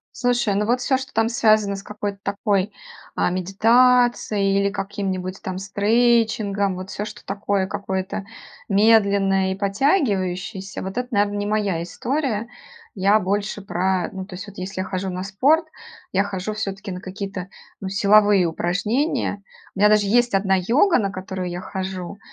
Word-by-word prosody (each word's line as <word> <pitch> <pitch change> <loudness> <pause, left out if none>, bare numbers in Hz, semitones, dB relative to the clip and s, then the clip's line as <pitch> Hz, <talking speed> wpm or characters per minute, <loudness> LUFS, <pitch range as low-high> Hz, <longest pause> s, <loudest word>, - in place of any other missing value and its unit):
Слушай, 240 -4 +1
ну 210 +2 0
вот 245 +1 +2
всё, 265 +1 +1
что 265 +1 -8
там 225 +1 +2
связано 215 -3 +3
с 195 - -7
какой-то 205 -1 -5
такой, 200 -1 0 0.4
а, - - +1
медитацией 215 +1 +3
или 200 - +2
каким-нибудь 195 -2 -4
там 185 -1 -4
стрейчингом, 205 -1 +1
вот 185 +1 -7
всё, 205 - -4
что 210 0 -9
такое 200 -1 -1
какое-то 190 0 -3 0.5
медленное 200 -2 +3
и - - -6
потягивающееся, 195 - -1
вот 190 +6 -3
это, 250 - -3
наверное, 205 -1 +1
не 205 - -2
моя 205 -5 0
история. 235 - -2 0.5
Я 200 +3 +4
больше 205 +1 -2
про 185 -1 0
Ну, 190 0 -5
то 185 - -9
есть 200 +3 -7
вот 200 -2 -11
если 185 0 -4
я - - -3
хожу 190 0 -3
на 180 +1 -4
спорт, 275 - +2 0.5
я 195 +1 +2
хожу 200 +1 -4
всё-таки 195 -2 -5
на 180 0 -6
какие-то, 195 -1 -6 0.3
ну, 190 - -4
силовые 200 -1 +4
упражнения. 205 - -1 0.3
У - - -8
меня 210 +1 +6
даже 210 -1 +4
есть 240 +1 +3
одна 195 0 +2
йога, 245 - +3
на 195 -2 -1
которую 185 -1 -5
я 175 0 -4
хожу, 190 0 -5
200 Hz, 160 wpm, -22 LUFS, 190-215 Hz, 0.5 s, меня